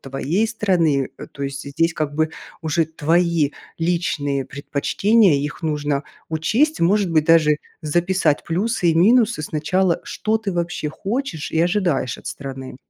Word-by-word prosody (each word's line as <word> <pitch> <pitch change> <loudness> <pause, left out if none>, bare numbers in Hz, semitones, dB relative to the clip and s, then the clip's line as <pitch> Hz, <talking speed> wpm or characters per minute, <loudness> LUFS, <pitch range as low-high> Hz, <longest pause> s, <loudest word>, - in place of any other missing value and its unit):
твоей 145 +10 -1
страны. 175 - +1
Э, - - -8
то 140 - -9
есть 140 0 -4
здесь 165 +4 +1
как 150 -2 -3
бы 155 +1 +1 0.3
уже 160 +1 +1
твои 165 -1 +1 0.3
личные 165 -5 -1
предпочтения, 165 - +2
их 145 +3 -4
нужно 145 -2 -1 0.2
учесть. 220 - +1
Может 190 +1 +2
быть 155 -2 +3
даже 155 -2 +5 0.3
записать 170 0 +1
плюсы 180 +1 0
и - - +1
минусы 220 0 +4
сначала, 170 +4 0
что 220 +1 -1
ты 210 -3 -3
вообще 170 -3 -2
хочешь 195 - -4
и 160 - +1
ожидаешь 175 - +1
от - - -14
страны. 135 -2 -7
165 Hz, 145 wpm, -21 LUFS, 145-190 Hz, 0.3 s, даже